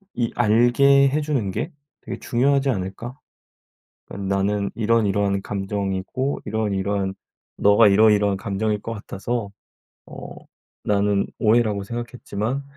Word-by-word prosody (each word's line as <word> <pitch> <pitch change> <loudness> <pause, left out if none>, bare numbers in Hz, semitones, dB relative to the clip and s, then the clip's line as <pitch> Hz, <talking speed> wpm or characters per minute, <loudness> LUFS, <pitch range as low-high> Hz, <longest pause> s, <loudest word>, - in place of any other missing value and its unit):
이 120 -2 -1
알게 130 +5 +4
해주는 145 -8 -1
게 160 - -3 0.3
되게 - - -7
중요하지 140 +2 +1
않을까? 110 +4 -4 0.9
어 - - -8
나는 100 +1 -1
이러이러한 100 -3 +1
감정이고 100 +6 -3
이러이러한 100 -2 -1 0.4
너가 105 +2 +5
이러이러한 105 -1 +4
감정일 105 +2 -2
것 115 - -5
같아서 105 +1 -4 0.6
어 - - -9 0.5
나는 100 -1 +1
오해라고 110 -2 +2
생각했지만 120 +2 -4
105 Hz, 275 characters per minute, -22 LUFS, 100-120 Hz, 0.9 s, 너가